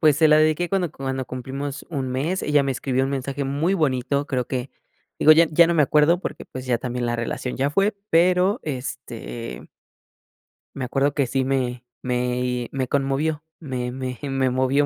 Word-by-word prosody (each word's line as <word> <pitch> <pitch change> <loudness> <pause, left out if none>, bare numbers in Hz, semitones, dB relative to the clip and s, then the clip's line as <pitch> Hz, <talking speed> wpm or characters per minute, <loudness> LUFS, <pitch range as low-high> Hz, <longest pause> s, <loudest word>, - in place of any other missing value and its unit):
pues, 155 -4 +5
se 155 0 +5
la 155 - +6
dedique 155 +3 +2
cuando 185 -5 0
cuando 135 -1 -3
cumplimos 135 +3 -5
1, 135 -4 -2
mes, 150 +9 -1
ella 150 -1 +3
me 135 - 0
escribió 130 +1 0
un 135 - -2
mensaje 140 +1 -3
muy 145 +7 0
bonito, 140 -3 0
creo 125 -3 -1
que, 130 0 -3 0.5
digo, 155 - +8
ya 165 +1 +6
ya 170 +2 +6
no 170 - +1
me 155 - +5
acuerdo, 150 +5 +4
porque, - - -5
pues 130 0 -8
ya 120 -2 +1
también 125 -1 -3
la 120 - 0
relación 120 +2 -3
ya 140 +2 +1
fue 200 +5 +1
pero 180 +5 +3
este 125 -4 -6 1.1
me 130 - -3
acuerdo 135 +2 +1
que 140 -3 +1
sí 130 +2 0
me 125 -2 -1 0.2
me 125 -1 -1 0.2
conmovió, 145 +3 0 0.2
me 125 -5 -4
me 130 -1 -5
me 135 -2 0
movió 130 +3 +2
135 Hz, 180 wpm, -23 LUFS, 125-150 Hz, 1.1 s, digo